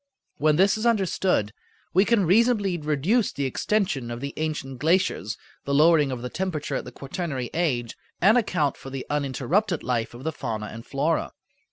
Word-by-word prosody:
When 150 0 +3
this 195 +5 +3
is 230 - +1
understood 190 - +1 0.4
we 190 +3 +5
can 225 -4 +3
reasonably 205 0 +3
reduce 160 - +1
the 140 - -3
extension 135 - 0
of 120 0 -5
the 140 +2 -5
ancient 150 -5 -3
glaciers, 165 - +1 0.3
the 140 - -1
lowering 150 -2 +5
of 125 -2 -5
the - - -2
temperature 175 -2 -3
at - - -3
the - - -8
quaternary 140 -4 -4
age, 125 -9 -1 0.2
and 210 +5 +5
account 175 - +1
for 135 - -9
the 135 -1 -5
uninterrupted 150 - 0
life 120 -2 -1
of 125 - -10
the 160 - -1
fauna 110 -7 -4
and 115 +1 -10
flora. 150 +4 0
155 Hz, 175 wpm, -25 LUFS, 135-190 Hz, 0.4 s, we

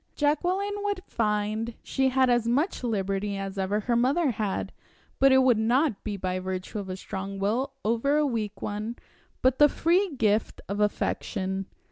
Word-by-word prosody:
Jacqueline 360 +7 +1
would 405 -2 -2
find 215 +1 -1
she 265 0 +1
had 260 0 +3
as 240 -2 +2
much 280 +6 0
liberty 200 -3 -1
as 195 0 -5
ever 200 +3 0
her 235 +3 0
mother 270 +5 +2
had, 210 -3 -2 0.5
but 270 0 +6
it 265 0 +6
would 245 -4 +4
not 240 +1 +1
be 205 -2 -3
by 185 -1 -2
virtue 185 +3 -4
of 195 -2 -6
a 185 - -4
strong 195 0 -5
will 235 +8 0
over 235 +7 +2
a 300 - +3
weak 220 -6 -3
one, 215 +3 -3 0.5
but 260 0 +3
the 295 0 +8
free 350 +2 +1
gift 215 -3 +1
of 200 +1 -3
affection. 195 -2 -1
225 Hz, 170 wpm, -27 LUFS, 200-270 Hz, 0.5 s, the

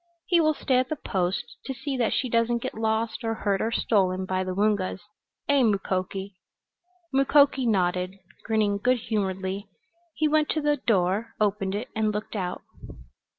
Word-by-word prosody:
He 345 -2 +4
will 310 -1 +3
stay 255 -2 +2
at 255 - -1
the 310 - -1
Post 185 -8 -2
to 270 - -4
see 270 +1 -4
that 240 -3 +1
she 255 - 0
doesn't 235 0 +1
get 255 - -3
lost, 220 +1 -1
or 225 0 -1
hurt, 200 -3 0
or 225 - 0
stolen 190 -5 +1
by 185 0 -1
the 185 0 -4
Woongas. 200 -2 +1 0.5
Eh, 285 -1 +4
Mukoki?" 195 -2 -1 0.8
Mukoki 275 -1 +4
nodded, 185 -2 +1 0.3
grinning 210 -2 +1
good 250 +4 +3
humoredly. 195 -3 -2 0.5
He 310 - +2
went 305 0 +2
to - - +1
the 295 0 +2
door, 210 -1 0
opened 200 -2 0
it 225 +5 -4
and 215 -1 +1
looked 210 +1 -5
out. 180 -3 -3
215 Hz, 165 wpm, -26 LUFS, 190-255 Hz, 0.8 s, He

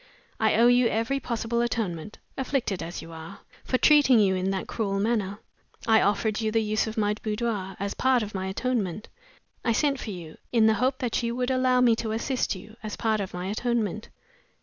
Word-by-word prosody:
I 220 -1 +3
owe 230 +2 +5
you 245 0 +5
every 230 +5 0
possible 235 -2 -2
atonement 210 -6 -3 0.2
(afflicted 260 -7 -1
as 170 0 -6
you 165 - -11
are) 160 0 -10 0.2
for 255 - +1
treating 285 -4 +6
you 195 -3 +4
in 185 0 -1
that 195 -1 -2
cruel 200 -3 -2
manner. 205 -2 0 0.5
I 220 -1 +5
offered 210 +2 +1
you 220 -1 0
the 225 0 +2
use 215 +1 0
of 220 - -6
my 210 -1 +2
boudoir, 210 -3 -2
as 200 +1 -2
part 260 -3 +2
of 210 - -7
my 190 -1 -3
atonement. 210 -1 -2 0.5
I 230 - +2
sent 280 +2 +1
for 225 - -6
you, 170 -5 -8
in 230 -3 +4
the 220 - +5
hope 260 +1 +2
that 245 -2 -1
you 235 0 -2
would 250 +1 -1
allow 255 -1 +3
me 235 -2 +5
to 220 -1 -2
assist 245 0 -1
you, 215 +4 -12
as 215 -1 -5
part 220 -2 0
of 195 -2 -4
my 180 0 -4
atonement. 215 0 -1
220 Hz, 205 wpm, -26 LUFS, 200-240 Hz, 0.5 s, treating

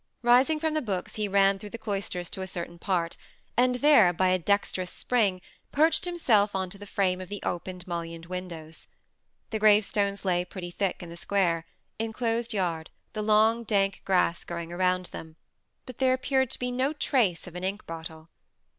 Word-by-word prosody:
Rising 255 +6 +5
from 315 0 0
the 310 - +1
books 195 -8 -3
he 215 -1 -1
ran 195 0 +3
through 210 - -8
the 230 - -6
cloisters 200 -5 -3
to 190 - -4
a 190 - -4
certain 170 -1 -6
part, 170 -3 -1 0.4
and 250 +1 +3
there, 250 -9 +6
by 185 +2 +2
a 185 0 +2
dexterous 185 0 0
spring, 205 -7 0 0.3
perched 315 +5 +3
himself 225 - +2
on 190 -1 -2
to 200 - -8
the 205 - -10
frame 185 -2 0
of 185 - -8
the 205 0 -5
open 180 +1 -3
mullioned 170 -1 -5
windows. 170 -3 -7 0.6
The 220 - -1
gravestones 205 -1 +3
lay 180 -1 +2
pretty 180 -1 -7
thick 190 0 -2
in 170 - -8
the 170 - -8
square, 170 -3 0 0.3
enclosed 230 +1 -1
yard, 175 -6 -1 0.2
the 215 - -3
long, 220 +2 +4
dank 200 -3 +1
grass 180 -3 +2
growing 170 0 -6
around 185 0 +1
them; 160 -1 -9 0.5
but 255 -3 -10
there 260 -1 +4
appeared 265 0 +1
to - - -4
be 250 0 -2
no 260 +4 0
trace 240 - +1
of 180 - -10
an 180 +1 -6
ink 195 +2 -3
bottle. 160 -1 -8
195 Hz, 185 wpm, -27 LUFS, 180-225 Hz, 0.6 s, there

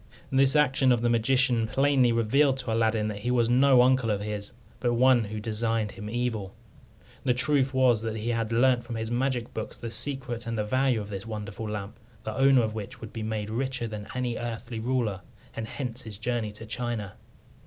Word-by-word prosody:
This 135 +1 +4
action 135 -3 +4
of 120 -2 +2
the 120 0 +2
magician 120 0 +2
plainly 135 -1 +3
revealed 130 +5 +3
to 125 -4 -2
Aladdin 110 -1 +1
that 105 -1 -5
he 120 - -3
was 120 -1 +2
no 130 0 +6
uncle 130 -2 +3
of 105 -2 +1
his, 105 -1 -4 0.3
but 120 -1 +1
one 125 -1 +4
who 105 +1 -5
designed 110 0 -1
him 105 +1 -8
evil. 115 -5 -2 0.7
The 125 -2 +2
truth 135 0 +2
was 130 -4 +3
that 110 -1 -3
he 110 +2 -3
had 115 -1 -1
learnt 120 +1 +3
from 120 -1 -6
his 110 0 -3
magic 125 -1 -1
books 110 - -5
the 115 - -6
secret 120 -1 -2
and 115 0 -2
the 105 - 0
value 130 +1 +1
of 105 - -8
this 100 +1 -6
wonderful 105 0 -5
lamp, 105 +1 -6 0.2
the 110 - -4
owner 135 -2 +5
of 110 -1 -2
which 110 +1 -7
would 110 -3 -9
be 115 - -5
made 110 -1 -3
richer 130 +1 -2
than 105 -1 -7
any 125 -2 -1
earthly 120 0 -5
ruler, 115 -5 -1 0.3
and 110 -1 -4
hence 125 0 -5
his 110 -5 -7
journey 115 -1 -2
to 110 +2 -10
China. 115 -3 -4
115 Hz, 205 wpm, -27 LUFS, 110-130 Hz, 0.7 s, no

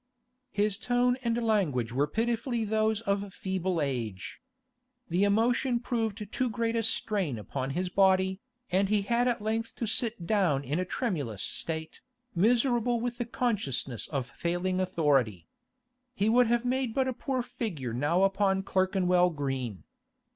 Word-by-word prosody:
His 205 -1 0
tone 245 +1 +2
and 235 -2 0
language 150 - +1
were 140 +3 +2
pitifully 230 - -1
those 220 0 +1
of 200 -2 -1
feeble 190 -2 -1
age. 120 -10 -3 0.7
The 175 +4 +2
emotion 235 +4 +2
proved 225 -4 -2
too 255 -1 0
great 230 +1 -1
a 230 - +2
strain 205 - 0
upon 130 +5 -4
his 185 +1 0
body, 190 0 +3 0.3
and 190 +2 +2
he 210 -1 +2
had 235 +4 +2
at 235 -4 0
length 225 +1 -2
to 235 - -2
sit 225 -3 -2
down 170 -9 +2
in 145 +6 -1
a 185 - 0
tremulous 145 - -2
state, 160 -1 -4 0.3
miserable 240 +4 +2
with 240 +1 -3
the 240 - -1
consciousness 195 - -2
of 135 -4 -2
failing 175 +2 -1
authority. 140 - +1 0.7
He 210 -1 +2
would 245 +1 +5
have 240 +1 +1
made 255 -2 0
but 265 -1 +2
a 260 - -1
poor 255 +1 -2
figure 160 - -4
now 150 +9 +2
upon 195 0 +2
Clerkenwell 185 -2 +2
Green. 135 - -3
200 Hz, 150 wpm, -29 LUFS, 165-230 Hz, 0.7 s, would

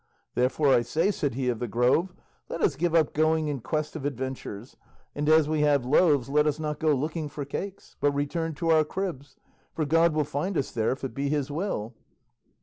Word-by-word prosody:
"Therefore, 130 +4 +2
I - - +5
say," 160 - +1
said 145 - -2
he 130 -1 -2
of 120 -3 -1
the 120 - -2
Grove, 125 - +2 0.4
"let - - -4
us 140 - +2
give 170 +3 0
up 160 -3 +3
going 155 0 +2
in 140 -2 -2
quest 155 +6 -3
of 155 - -5
adventures, 130 -4 -5 0.4
and 150 +1 -1
as 155 -1 +5
we 155 -1 0
have 145 -4 +3
loaves 145 -1 +3
let 150 +2 +2
us 150 0 0
not 150 -1 -3
go 155 -2 +3
looking 155 +3 -3
for 145 -1 -6
cakes, 195 +7 -7
but 145 - +3
return 155 +3 -2
to 165 +2 -2
our 160 -1 +5
cribs, 150 -4 -5 0.4
for 155 - 0
God 165 +2 +3
will 155 - +2
find 150 +6 -2
us 135 - -1
there 110 -2 0
if 135 - -5
it 135 - -4
be 140 +3 -2
his 145 -1 -1
will." 145 - -3
150 Hz, 215 wpm, -27 LUFS, 135-160 Hz, 0.4 s, I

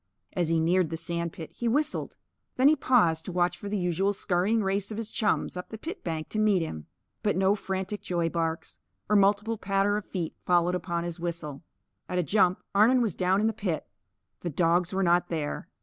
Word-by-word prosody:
As 175 -3 0
he 165 -1 +2
neared 170 +1 +2
the 165 - -3
sand 170 0 -3
pit, 160 -3 -9
he 240 - -3
whistled. 290 +6 -1 0.4
Then 260 +2 +5
he 310 - +6
paused 175 - +3
to - - -5
watch 175 0 +1
for 200 +3 -7
the 210 - -1
usual 185 +2 +1
scurrying 200 +3 +1
race 195 +1 -1
of 215 - -5
his 225 -1 -5
chums 210 -4 0
up 180 - -6
the 220 - -7
pit 330 - -7
bank 160 -2 -3
to 215 - -2
meet 205 -5 +3
him. 80 - -6 0.3
But 205 -3 +1
no 190 +1 +4
frantic 190 0 -3
joy 175 -4 -1
barks 165 -1 -3 0.3
or - - +5
multiple 205 +2 +3
patter 195 +1 +1
of 210 - -5
feet 170 -4 -4
followed 175 0 +3
upon 170 -1 -2
his 175 0 -5
whistle. 165 -5 -4 0.5
At 180 - -2
a 180 - +2
jump, 185 +2 +2
Arnon 235 +5 +5
was 215 -6 0
down 185 +3 +2
in - - +2
the 225 - +2
pit. 195 -6 -2 0.5
The 175 - -3
dogs 170 +2 +2
were 190 0 0
not 175 0 +3
there. 155 -3 -3
185 Hz, 210 wpm, -28 LUFS, 170-205 Hz, 0.5 s, he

